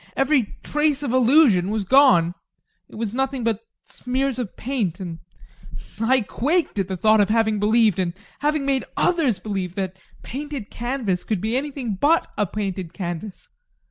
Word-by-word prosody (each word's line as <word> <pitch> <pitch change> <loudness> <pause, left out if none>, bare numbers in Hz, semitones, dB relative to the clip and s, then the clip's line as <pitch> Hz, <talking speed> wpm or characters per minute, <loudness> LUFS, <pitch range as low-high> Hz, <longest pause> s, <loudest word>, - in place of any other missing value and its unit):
Every 270 -5 +1
trace 295 -1 0
of 255 -4 -2
illusion 250 - +5
was 215 -1 -1
gone 200 -9 +5 0.6
it - - -14
was 220 -1 -3
nothing 265 0 -1
but 225 -2 0 0.3
smears 260 +1 -2
of 235 -6 -5
paint, 220 -9 -2
and 170 -3 -6 0.8
I 250 +3 +3
quaked 290 - 0
at 190 - 0
the 190 -1 -4
thought 215 +3 +4
of 205 - +2
having 220 -1 +2
believed, 215 -1 +3
and 175 -1 -1 0.2
having 300 -1 0
made 270 -1 +1
others 310 - +2
believe, 185 -2 -4
that 190 -1 -3
a 190 - -28
painted 280 -4 -6
canvas 240 -7 -2
could 215 -4 -1
be 220 +5 -1
anything 265 -6 -3
but 320 +4 +4
a 210 - 0
painted 190 -4 -4
canvas. 180 +1 -6
225 Hz, 165 wpm, -22 LUFS, 195-270 Hz, 0.8 s, illusion